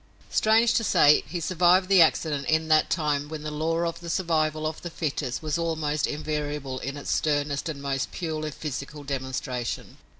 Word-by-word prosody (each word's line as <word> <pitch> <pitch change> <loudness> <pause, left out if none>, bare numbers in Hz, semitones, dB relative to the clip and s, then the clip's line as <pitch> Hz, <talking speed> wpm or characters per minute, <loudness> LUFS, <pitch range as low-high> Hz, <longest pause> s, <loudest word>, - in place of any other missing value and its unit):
Strange 225 +2 +4
to 230 - +2
say 150 -7 +5
he 175 - -4
survived 180 +2 +3
the 195 -2 +6
accident 155 -3 +2
in 160 0 +1
that 155 0 +4
time 150 -3 0
when 155 -1 -6
the 155 - -4
law 160 +2 -1
of 170 - -3
the 170 0 -8
survival 155 -3 0
of 155 0 -3
the 175 - -5
fittest 145 -5 -3
was 155 +1 -1
almost 155 -3 -1
invariable 150 -3 -3
in 140 +2 -5
its 145 - -4
sternest 145 0 0
and 140 -3 -6
most 135 -1 -2
purely 155 -3 -3
physical 145 0 -6
demonstration. 130 -3 -4
155 Hz, 175 wpm, -26 LUFS, 145-165 Hz, -, the